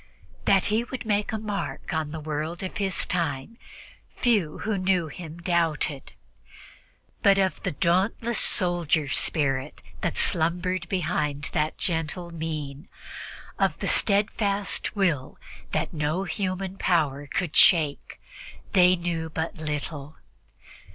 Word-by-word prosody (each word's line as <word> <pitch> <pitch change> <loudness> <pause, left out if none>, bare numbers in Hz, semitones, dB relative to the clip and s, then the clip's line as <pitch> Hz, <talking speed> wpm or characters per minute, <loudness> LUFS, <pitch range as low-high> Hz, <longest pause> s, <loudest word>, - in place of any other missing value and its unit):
That 195 -1 +4
he 225 +2 +2
would 250 0 -6
make 210 -1 +1
his 220 - -2
mark 205 -5 -4
on 160 -2 -1
the 160 +1 -5
world 155 +3 -4
of 185 - -5
his 195 -3 +1
time, 170 - -2 0.6
few 205 -11 +1
who 215 -1 0
knew 185 -3 +1
him 160 +2 -8
doubted; 165 -5 0 1.1
but 200 -1 +5
of 190 -1 +1
the - - -1
dauntless 195 - +1
soldier 175 -5 +2
spirit 135 -1 0 0.2
that 175 - -1
slumbered 180 +2 +1
behind 150 -5 -1
that 150 +1 0
gentle 170 +1 -2
mien, 155 -1 -5 0.7
of - - +2
the - - -3
steadfast 200 -1 +1
will 155 -9 0 0.3
that 155 +2 -1
no 155 +4 0
human 190 0 -3
power 145 -5 +1
could 170 +2 -2
shake, 155 -5 +4 0.5
they 180 -1 +6
knew 170 -2 -3
but 160 +1 -3
little. 150 -1 -4
170 Hz, 125 wpm, -26 LUFS, 155-190 Hz, 1.1 s, they